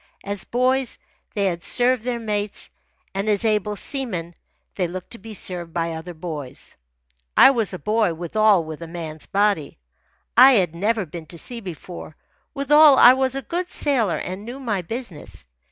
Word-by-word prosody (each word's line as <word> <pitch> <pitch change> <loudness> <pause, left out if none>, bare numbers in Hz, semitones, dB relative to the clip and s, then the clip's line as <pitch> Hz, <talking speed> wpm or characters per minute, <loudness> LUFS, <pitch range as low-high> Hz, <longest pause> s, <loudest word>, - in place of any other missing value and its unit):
As 200 -2 -4
boys 255 +1 +1 0.4
they 200 -1 +1
had 175 -3 -1
served 250 0 +3
their 245 +1 -2
mates, 210 -2 -2 0.4
and 195 +2 -1
as 210 +1 +2
able 210 -1 +1
seamen 200 - -4 0.4
they 180 -3 -1
looked 180 +1 -8
to 235 - -8
be 220 +2 -9
served 175 -3 -5
by 170 -1 -1
other 165 +2 -7
boys. 155 -6 -7 0.6
I - - +9
was 230 -6 0
a 185 - -5
boy 210 -3 +1
withal 195 +2 +3
with 155 0 -8
a 165 - -6
man's 160 -2 -7
body. 200 -6 0 0.6
I 260 +3 +9
had 180 -8 +2
never 210 +4 0
been 165 0 -9
to 170 - -10
sea 235 +8 -5
before 175 -4 -9 0.4
withal 295 0 +6
I 245 - +9
was 265 0 0
a 275 - -3
good 350 +8 -3
sailor 245 - +1
and 185 +3 -5
knew 245 +4 -7
my 220 -8 -1
business. 165 - -6
205 Hz, 170 wpm, -22 LUFS, 170-240 Hz, 0.6 s, I